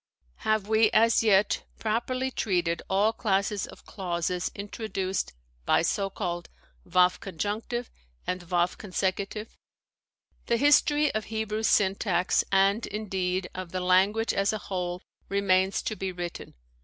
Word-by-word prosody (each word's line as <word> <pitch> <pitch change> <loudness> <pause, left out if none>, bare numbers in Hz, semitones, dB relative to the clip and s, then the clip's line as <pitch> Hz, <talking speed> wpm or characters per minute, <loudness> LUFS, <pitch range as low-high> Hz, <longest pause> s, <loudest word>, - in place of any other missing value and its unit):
Have 215 -2 0
we 220 0 +4
as 230 +1 +5
yet 210 -2 +3 0.2
properly 255 +4 -1
treated 175 -8 0
all 205 +3 +3
classes 200 -2 0
of - - -14
clauses 180 -1 -2
intro 205 +2 -6
duced 190 - -2 0.3
by - - +3
so 195 -1 0
called 175 -3 -4 0.4
waw 180 0 +6
conjunctive 210 +7 -4 0.3
and 180 0 -2
waw 175 -1 +3
consecutive? 195 +3 -3 0.9
The 235 - +2
history 295 +2 +4
of 215 0 -2
Hebrew 220 0 -2
syntax, 190 -4 +2
and, 195 +3 +3
indeed, 190 -3 -2
of 185 -2 -6
the 185 - -1
language 190 +5 +3
as 195 0 +2
a 215 - -2
whole, 180 -3 -4 0.3
remains 190 -1 +2
to 215 - -2
be 190 -2 -3
written. 175 -1 -6
195 Hz, 130 wpm, -27 LUFS, 185-220 Hz, 0.9 s, waw